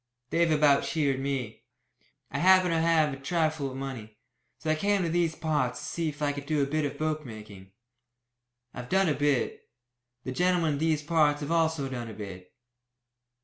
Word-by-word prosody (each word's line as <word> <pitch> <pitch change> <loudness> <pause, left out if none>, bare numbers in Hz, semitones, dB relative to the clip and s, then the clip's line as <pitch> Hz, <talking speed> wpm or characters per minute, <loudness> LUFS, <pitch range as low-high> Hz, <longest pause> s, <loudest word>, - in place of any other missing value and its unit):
They've 170 0 +3
about 150 -2 +4
sheared 140 -5 0
me. 135 -5 -3 0.7
I 140 - -2
happened 185 +1 +5
to 165 - +2
have 160 -3 +3
a - - -6
trifle 155 -1 -1
of 130 - -8
money, 125 -6 -7 0.4
so 155 - -2
I - - +2
came 200 +3 +1
to 170 - -1
these 165 -1 +1
parts 150 -7 -1
to - - -7
see 165 -2 -2
if 150 0 -7
I 145 - +2
could 140 0 -7
do 150 -2 +1
a - - +2
bit 150 +2 -1
of 140 0 -4
bookmaking. 110 -11 -5 1.0
I've 125 -1 -8
done 190 -2 +3
a - - +2
bit. 145 -3 -1 0.5
The 130 - -4
gentlemen 175 +2 +2
in 140 - -3
these 155 -1 +1
parts 150 -2 +2
have 145 +2 -4
also 160 -4 +1
done 120 -3 -5
a 110 - -9
bit. 95 -3 -9
150 Hz, 190 wpm, -28 LUFS, 135-160 Hz, 1.0 s, happened